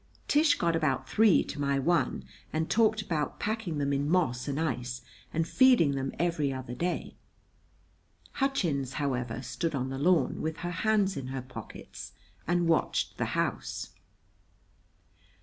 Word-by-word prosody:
Tish 295 0 +4
got 170 -1 +1
about 135 -5 0
three 215 -4 +5
to 145 - -6
my 140 -1 +1
one, 170 +6 +1 0.3
and 160 +1 -1
talked 220 -1 +3
about 160 -7 -2
packing 215 -7 -2
them 140 -1 0
in 140 +1 0
moss 155 -9 +1
and 140 +1 -1
ice, 125 -5 -2 0.3
and 165 +1 0
feeding 250 - +5
them 135 -1 -2
every 165 -4 0
other 130 -2 -5
day. 175 +8 -2 1.2
Hutchins, 170 - 0
however, 125 -4 -2
stood 160 +5 -2
on 130 -1 -2
the 135 - -4
lawn, 160 -3 +2
with 160 0 -2
her 175 - -2
hands 200 +1 +1
in 135 -2 -4
her 130 -1 -4
pockets, 130 - -9 0.3
and 175 0 +2
watched 165 - +1
the - - +1
house. - - -2
155 Hz, 150 wpm, -29 LUFS, 135-180 Hz, 1.2 s, three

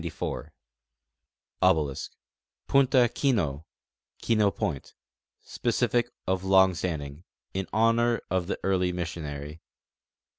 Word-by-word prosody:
t 85 - -4 2.6
Punta 135 -2 +4
Kino 80 - 0 0.5
(Kino 110 -3 +2
point): 75 -7 -4 0.5
Specific 120 0 0 0.2
(of 95 0 -1
long 95 -1 +5
standing) 80 -3 -4 0.3
in 95 0 -3
honor 115 +1 +3
of 90 -1 0
the - - -3
early 90 -2 +1
missionary. 80 -3 -5
95 Hz, 85 wpm, -27 LUFS, 80-115 Hz, 2.6 s, long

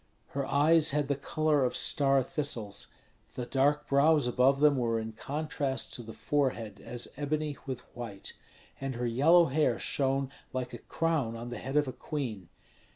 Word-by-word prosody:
Her 140 -1 -3
eyes 155 +2 +4
had 145 0 0
the 140 - +2
color 150 +1 +1
of 125 - 0
star 135 -3 +3
thistles; 120 -7 -3 0.5
the 125 - -3
dark 145 +3 +1
brows 145 +1 +4
above 130 +3 +3
them 150 -1 +5
were 115 -3 0
in 110 0 -5
contrast 140 +1 -2
to - - -4
the 115 -1 -9
forehead 130 -5 -1
as 120 0 -3
ebony 150 0 -2
with 130 -2 -4
white, 115 -5 -7 0.5
and 135 -1 -4
her 120 +1 -2
yellow 155 +9 +5
hair 150 +1 +1
shone 135 -1 0 0.2
like 130 -1 -3
a 120 - -6
crown 155 -8 -1
on 120 +1 -6
the 120 - -6
head 135 +2 -5
of 150 -1 +3
a 130 - -4
queen. 120 - -5
135 Hz, 170 wpm, -30 LUFS, 120-150 Hz, 0.5 s, them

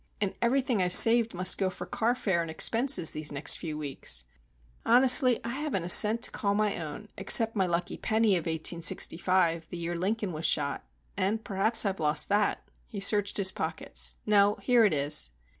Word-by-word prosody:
And 200 -2 -3
everything 245 -2 -1
I've 180 0 +5
saved 230 -2 +7
must 185 +1 +2
go 190 -2 -1
for 180 -1 -10
car 230 +6 -2
fare 190 -8 -2
and 165 - -7
expenses 230 - +1
these 155 -1 -5
next 145 +1 +2
few 155 -3 -7
weeks. 135 - -5 0.6
Honestly, 250 +1 +5
I 230 - -6
haven't 265 - -5
a 175 - -7
cent 215 +5 +5
to - - -2
call 200 -1 -3
my 210 -1 -1
own, 160 +8 -10
except 225 0 +2
my 190 -3 -1
lucky 175 0 -4
penny 220 -2 0
of 175 -1 -4
1865, 165 +1 -2
the 175 - -8
year 170 +1 -5
Lincoln 195 +2 -4
was 155 +1 -3
shot. 140 -2 -2 0.3
And 215 +4 -3
perhaps 215 +4 +1
I've 195 -2 -3
lost 150 -1 -1
that." 205 0 -2 0.2
He 210 - -9
searched 205 0 +1
his 190 -2 +1
pockets. - - -6
"No,—here 210 +3 +1
it 205 - 0
is." 145 - -1
195 Hz, 180 wpm, -26 LUFS, 170-225 Hz, 0.6 s, saved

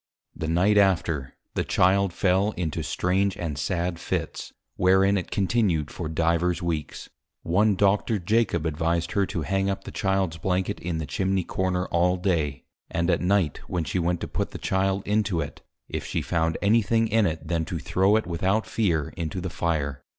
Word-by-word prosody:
The 80 - -4
Night 95 +6 +3
after, 80 -9 +1 0.2
the - - 0
Child 95 +1 +3
fell 95 +4 +1
into 80 -4 -3
strange 95 +2 0
and 80 -4 -3
sad 85 +4 -2
Fits, - - -3 0.2
wherein 95 +2 +4
it 90 -4 -2
continued 95 -7 +1
for 85 -4 -5
Divers 85 +2 +1
Weeks. 80 -4 -4 0.3
One 100 +5 +3
Doctor 100 +3 +2
Jacob 95 -3 +1
advised 85 +2 0
her 100 -2 +1
to 85 - -3
hang 95 +3 0
up 100 - -3
the - - -8
Childs 95 -4 0
Blanket, 95 +3 -1
in 85 -1 -3
the 80 - -3
Chimney 95 +7 0
Corner 90 0 -1
all 90 +2 +2
Day, 80 -8 -1 0.3
and 85 0 0
at - - +1
Night, 90 -4 +1
when 90 -2 -1
she 90 - -2
went 85 0 0
to - - -3
put - - -2
the - - -7
Child 95 +1 0
into 105 -4 +1
it, 75 -3 -5 0.3
if - - -4
she - - -2
found 80 -1 0
any 110 +3 +5
Thing 115 +2 +1
in 110 -1 +3
it 80 0 -4
then 80 -1 0
to 85 - -4
throw 95 +6 +2
it 110 - +1
without 95 +5 0
fear 85 -10 0
into 85 +1 -3
the 90 -1 -4
Fire. 75 -6 -1
90 Hz, 185 wpm, -25 LUFS, 85-100 Hz, 0.3 s, any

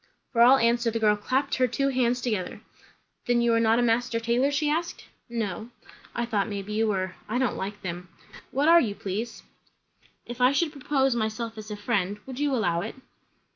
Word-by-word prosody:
For 235 - +2
all 255 +3 +8
answer 235 -1 +2
the 230 - -2
girl 215 -2 +3
clapped 260 +7 -1
her 255 -1 +3
two 275 +3 0
hands 250 -2 +1
together. 215 -7 -3 0.7
"Then 245 0 +3
you 235 -1 +3
are 230 - +3
not 225 0 +3
a 245 - +2
master 230 0 +1
tailor?" 235 +4 +1
she 290 +1 0
asked. 330 +3 -2 0.2
"No." 220 -2 -3 0.5
"I 235 - 0
thought 210 -4 -1
maybe 205 0 -5
you 220 +1 +1
were. 185 -3 -1 0.2
I 230 - 0
don't 255 -3 +1
like 205 +2 -5
them. 180 -1 -5 0.4
What 280 +3 +1
are 335 +1 +8
you, 205 -4 -2
please?" 210 +5 -5 0.8
"If 240 +1 -7
I 250 +2 +5
should 305 +2 +1
propose 270 -3 0
myself 225 0 -2
as 215 0 -9
a 210 - -5
friend, 205 -2 -1
would 265 0 -7
you 290 -1 +1
allow 175 -8 +1
it?" - - -6
235 Hz, 200 wpm, -26 LUFS, 210-255 Hz, 0.8 s, all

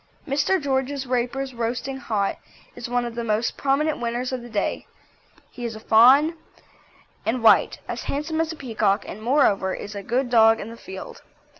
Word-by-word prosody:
Mr. 290 +7 +1
George 270 -1 -1
Raper's 255 +2 -2
Roasting 245 +3 -3
Hot 210 -6 -2 0.4
is 235 - -7
one 245 0 0
of 235 - -5
the 235 0 -4
most 220 +1 0
prominent 290 +3 0
winners 240 +2 -2
of 255 -1 -3
the 240 - -10
day; 205 -3 -2 0.6
he 245 - -9
is 230 -2 -4
a - - -8
fawn 260 +9 +5 0.9
and 230 +1 -1
white, 225 - +5
as - - -5
handsome 315 +3 -2
as 325 0 -2
a - - -6
peacock 220 -7 0
and, 215 - -8
moreover, 215 -7 +2
is 205 - -7
a 200 - -5
good 245 +5 -1
dog 225 -1 +6
in 220 - -7
the - - -9
field. 190 -4 -9
245 Hz, 180 wpm, -23 LUFS, 225-275 Hz, 0.9 s, dog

